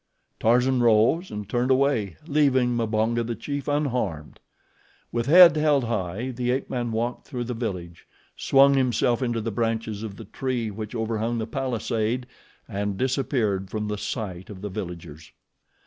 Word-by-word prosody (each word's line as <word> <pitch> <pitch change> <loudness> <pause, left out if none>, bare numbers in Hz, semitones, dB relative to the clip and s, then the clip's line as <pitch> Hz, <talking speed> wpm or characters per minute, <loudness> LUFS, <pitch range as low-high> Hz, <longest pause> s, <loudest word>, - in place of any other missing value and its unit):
Tarzan 125 +3 +3
rose 120 - +3
and 105 -1 -6
turned 120 +4 0
away, 130 - +1
leaving 135 -5 +2
Mbonga, 115 +1 0
the 115 0 -3
chief, 140 +5 -5
unharmed. 125 - -2 0.7
With 120 +1 -2
head 170 +1 +9
held 150 -3 +3
high 115 +1 -2
the 125 0 -3
ape 130 +2 -1
man 120 -2 -2
walked 115 +2 -3
through 125 -3 -4
the 125 +1 -4
village, 90 -7 -5 0.3
swung 140 +1 +5
himself 125 -2 +2
into 120 -3 -1
the 115 +1 -3
branches 110 -1 -2
of 110 -3 -6
the - - -10
tree 125 -4 -3
which 110 +3 -7
overhung 115 +1 -1
the 110 - -2
palisade 120 -1 -2 0.4
and 100 0 -3
disappeared 120 -7 0
from 105 0 -3
the 105 - -2
sight 95 -7 -5
of 95 -3 -9
the 105 - -4
villagers. 85 -6 -7
115 Hz, 155 wpm, -25 LUFS, 105-130 Hz, 0.7 s, head